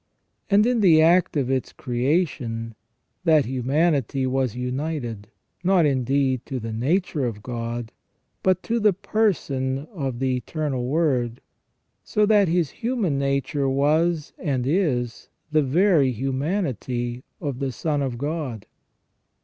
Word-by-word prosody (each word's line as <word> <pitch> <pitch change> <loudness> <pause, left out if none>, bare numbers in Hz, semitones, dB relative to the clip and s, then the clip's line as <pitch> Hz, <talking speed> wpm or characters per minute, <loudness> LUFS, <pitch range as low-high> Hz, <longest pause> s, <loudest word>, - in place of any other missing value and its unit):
And 205 +1 +5
in 245 -1 +2
the 170 -5 +6
act 170 0 +4
of 135 -2 0
its 130 -1 -1
creation 125 -3 -1 0.5
that 155 -5 +4
humanity 135 +1 +1
was 130 -3 0
united, 125 -4 -3 0.4
not 180 -2 +4
indeed 130 -1 +1
to 130 - -3
the 115 -1 -5
nature 150 - 0
of 105 -3 -6
God, 120 -1 -4 0.5
but 185 -1 +2
to 235 +1 0
the 210 -2 +4
person 155 -10 0
of 135 -8 -3
the 130 0 0
Eternal 135 -2 -3
Word, 130 -6 0 0.6
so 210 - +2
that 205 -2 +4
His 165 -3 +1
human 225 - -1
nature 140 0 0
was 155 +4 +1
and 135 -7 -1
is 130 -7 0 0.2
the 155 0 +4
very 150 -1 +3
humanity 130 - -2 0.2
of 140 -4 -4
the 135 -2 -1
Son 145 +4 -1
of 130 -3 -2
God. 140 -6 -4
140 Hz, 130 wpm, -24 LUFS, 125-165 Hz, 0.6 s, the